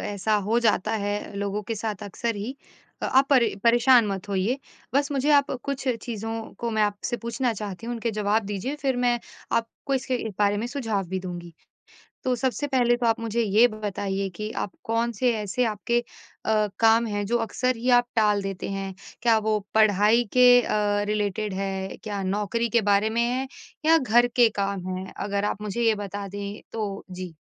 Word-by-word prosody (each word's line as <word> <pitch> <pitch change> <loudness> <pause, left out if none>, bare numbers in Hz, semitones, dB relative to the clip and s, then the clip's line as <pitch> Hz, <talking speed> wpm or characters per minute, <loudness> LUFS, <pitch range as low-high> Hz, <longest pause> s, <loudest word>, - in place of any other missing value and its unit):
ऐसा 205 +1 -1
हो 230 +2 +3
जाता 220 -2 +2
है 205 0 -3
लोगों 200 +1 -2
के 225 +3 -4
साथ 215 -1 -4
अक्सर 210 +3 -3
ही, 225 +7 -5 0.5
आप 265 +1 +4
परे 255 -4 +4
परेशान 240 0 +6
मत 195 0 -4
होइए। 200 +7 0 0.4
बस 285 +1 +2
मुझे 280 +2 +1
आप 285 -1 +4
कुछ 275 -1 -4 0.2
चीज़ों 225 -1 -5
को 235 - -2
मैं 220 -1 +1
आपसे 205 +4 -1
पूछना 235 +1 -1
चाहती 210 0 -6
हूँ, 240 - -2
उनके 230 0 -2
जवाब 215 +1 +1
दीजिए 205 +8 -3
फिर 275 -3 -1
मैं 245 -1 +2 0.3
आपको 230 +4 -1
इसके 260 -1 -1 0.2
बारे 205 0 +3
में 220 +3 -2
सुझाव 225 -7 -2
भी 190 +1 -2
दूँगी। 175 -2 -7 0.7
तो 255 - +1
सबसे 260 +4 -1
पहले 245 -3 +3
तो 240 - -1
आप 225 0 +2
मुझे 230 0 -1
ये 220 +2 +5
बताइए 200 -2 -3
कि 215 +2 -4
आप 195 - -6
कौन-से 230 +1 +1
ऐसे 215 +4 -1
आपके 225 +2 0 0.5
अ, 215 -1 +2
काम 225 +1 +5
हैं 205 -1 -2
जो 235 +4 +1
अक्सर 255 +2 0
ही 235 +2 -2
आप 245 -1 +5
टाल 210 -2 +3
देते 195 -1 -4
हैं। 195 -1 -4 0.3
क्या 230 -2 +4
वो 215 -1 +2 0.2
पढ़ाई 215 +2 +5
के 245 -1 +7
अ, 205 -2 +1
रिलेटेड 210 -1 -1
है? 190 0 -3
क्या 205 -3 -3
नौकरी 210 +4 -1
के 235 +1 +3
बारे 200 +2 +3
में 230 +2 0
है 250 +3 0 0.4
या 325 +1 +6
घर 240 -4 +4
के 240 -2 +6
काम 195 -2 -2
हैं? 185 0 -5
अगर 200 0 -1
आप 210 - -2
मुझे 210 +2 -3
ये 225 -1 +4
बता 200 +1 -5
दें 200 +1 -6
तो 205 -3 -4
जी। 180 -1 -7
220 Hz, 190 wpm, -25 LUFS, 200-240 Hz, 0.7 s, के